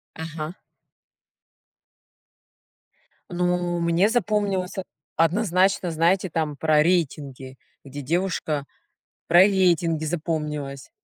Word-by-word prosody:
Ага. 160 0 -6 2.8
Ну, 175 -1 0
мне 170 +4 +3
запомнилось 205 -5 0
од 190 - -3 0.3
однозначно, 185 +1 +2
знаете, 170 +4 +2
там 155 -3 -2
про 155 0 +3
рейтинги, 140 -6 -1 0.3
где 140 +1 -8
девушка 160 -1 -1 0.6
про 175 +2 +7
рейтинги 175 -5 +2
запомнилось. 150 -4 -4
170 Hz, 80 wpm, -24 LUFS, 155-185 Hz, 2.8 s, про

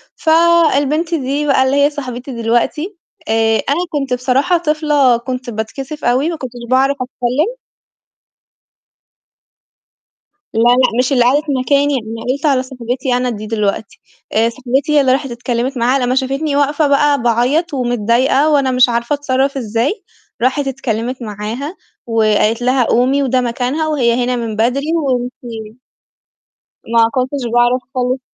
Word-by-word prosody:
فالبنت 325 -1 +2
دي 285 0 -1
بقى 270 -2 +3
اللي 265 +1 +1
هي - - +3
صاحبتي 260 -2 -7
دلوقتي، 270 - -1 0.3
آآ 225 0 +2
أنا 285 - +2
كنت 275 -4 -2
بصراحة 265 +8 +1
طفلة 300 -6 +2
كنت 250 +1 -5
باتكسف 245 +7 -6
أوي 255 +6 +2
ما 335 - -3
كنتش 260 -4 -7 0.2
باعرف 270 +2 +2
أتكلِّم. 255 - -2 3.0
لا، 225 - -1
لأ، 245 0 +3
مش 255 +2 +1
اللي 245 - +4
قعدت 280 +5 +3 0.2
مكاني، 285 +2 +2
أنا 225 -3 -4
قُلت 280 +3 -4
على 265 -3 +2
صاحبتي 255 0 -3
أنا 250 0 -1
دي 215 -2 -6
دلوقتي، 210 -1 -2 0.3
آآ 225 +2 +3
صاحبتي 265 +4 -2
هي 290 - +6
اللي 260 - +2
راحت 270 -1 0
اتكلِّمت 245 +2 -2
معاها 250 +3 +2
لمّا 250 +1 0
شافتني 275 +3 -1
واقفة 290 +1 +2
بقى 285 -1 +2
باعيّط 250 +8 +1
ومتضايقة، 245 +3 +1
وأنا 280 -3 +2
مش 255 0 +4
عارفة 235 +3 -1
أتصرّف 275 -1 0
إزاي، 245 - -2 0.4
راحت 270 +3 +1
اتكلِّمت 250 -1 -3
معاها 225 - -5 0.3
وقالت 220 0 +1
لها: 255 +1 +2
"قومي 260 +4 +2
وده 255 -1 +1
مكانها، 250 +6 -2
وهي 245 -5 +1
هنا 250 0 0
من 230 -3 -4
بدري 245 +6 0
وأنتِ" 245 -6 -3 1.2
ما 230 -1 +4
كنتش 260 +1 -2
باعرف 240 +1 +3
خالص، 255 +1 0
255 Hz, 140 wpm, -16 LUFS, 240-285 Hz, 3.0 s, هي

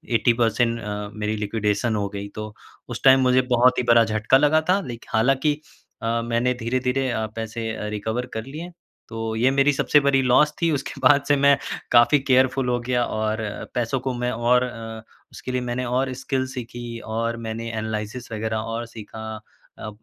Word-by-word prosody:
80 120 +1 +4
percent 115 0 +1
अ, 105 -1 -5
मेरी 105 0 -2
liquidation 105 +1 -1
हो 100 -1 -1
गई, 100 0 -6
तो 110 +1 -7 0.4
उस - - -6
टाइम 135 0 +7
मुझे 130 0 +4
बहुत 125 +1 +4
ही - - +1
बड़ा 115 0 +7
झटका 110 +4 +3
लगा 150 +3 +3
था, 190 +2 +4
लेकिन 120 -9 -8
हालाँकि 135 +6 +2 0.5
अ, 115 +1 0
मैंने 120 +2 +1
धीरे-धीरे 130 +2 0
अ, 110 -1 -1
पैसे 115 0 -4
अ, 105 - -5
रिकवर 110 +4 -3
कर 110 0 -4
लिए। 160 +6 -8 0.4
तो 115 -1 -4
ये 125 +4 +3
मेरी 140 +1 +3
सबसे 145 +2 +3
बरी 140 -1 +3
लॉस 130 +4 +4
थी 165 -1 +3
उसके 140 -3 -3
बाद 140 -1 +5
से 145 - +5
मैं 140 0 +5 0.3
काफी 120 +4 +6
केयरफुल 130 -1 +2
हो 120 0 +1
गया 125 0 0
और 110 0 -2 0.4
पैसों 120 +2 0
को 130 0 -2
मैं 125 0 -1
और 120 +1 +2
अ, 115 -2 -6 0.3
उसके 130 - -7
लिए 125 0 -1
मैंने 125 +1 -3
और 130 +2 0
स्किल 130 -1 -1
सीखी, 120 -2 -7
और 115 +1 -3
मैंने 115 0 -5
एनालिसिस 110 +2 -4
वगैरह 110 +1 -2
और 115 +2 -4
सीखा। 110 -1 -8 0.4
अ, 110 - -6
120 Hz, 185 wpm, -23 LUFS, 110-130 Hz, 0.5 s, टाइम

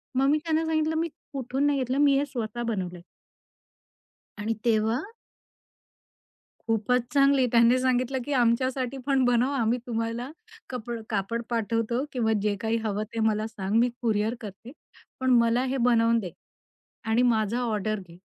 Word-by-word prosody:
मग 270 +1 +3
मी 300 - +4
त्यांना 320 0 0
सांगितलं 315 0 0
मी 330 +1 0 0.3
कुठून 270 +1 -1
नाही 285 -1 +1
घेतलं 260 +1 -1
मी 285 -1 +4
हे 280 - +1
स्वतः 240 -4 -4
बनवलंय. 185 -6 -3 1.4
आणि 215 +2 -1
तेव्हा 225 +2 +2 1.6
खूपच 225 +3 +1
चांगली 275 -2 +4
त्यांनी 235 +1 +5
सांगितलं 255 0 0
की 290 - -2
"आमच्यासाठी 255 +1 +1
पण 270 -2 +2
बनवं, 245 +3 +2
आम्ही 235 -1 +1
तुम्हाला 230 +2 -3 0.4
कपड 240 -2 -5
कापड 215 +2 -1
पाठवतो 230 +2 -1
किंवा 225 -3 +1
जे 205 0 0
काही 225 +1 0
हवं 210 -1 -1
ते 230 - -3
मला 220 -1 +1
सांग, 205 -2 -4
मी 245 +1 +3
कुरिअर 220 -1 +1
करते. 215 +3 -9 0.5
पण 260 0 0
मला 235 +2 +2
हे 265 +1 -1
बनवून 230 -1 +3
दे 180 -6 -6 0.7
आणि 225 +2 +2
माझा 220 +2 0
ऑर्डर 215 -3 -1
घे." 170 - -14
235 Hz, 150 wpm, -26 LUFS, 220-260 Hz, 1.6 s, त्यांनी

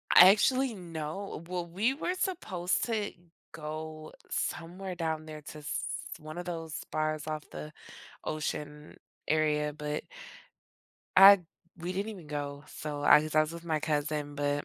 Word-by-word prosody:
Actually, 230 +7 +7
no 170 0 -5
well, 180 -1 -2
we 200 +10 +1
were 340 +5 -1
supposed 215 - 0
to 220 -3 -1 0.4
go 155 0 -6 0.2
somewhere 180 +2 -3
down 160 -2 -2
there 155 -1 -8
to 150 +1 -9
s 150 - -3 0.4
one 155 +2 -8
of 175 - -4
those 165 -3 -4
bars 155 0 -1
off 155 -1 -4
the 150 - -7 0.5
ocean 150 -1 -4 0.3
area, 150 -1 +2
but 150 0 -3 1.1
I 195 0 +11 0.4
we 175 +2 -3
didn't 200 +4 -2
even 180 -6 -11
go. 145 -1 -4
So 150 -1 -5
I 150 - +8
was 155 0 -5
I 155 - +7
was 155 - -3
with 170 0 -8
my 155 -2 0
cousin, 150 -1 -1
but 145 0 0
155 Hz, 150 wpm, -31 LUFS, 150-180 Hz, 1.1 s, I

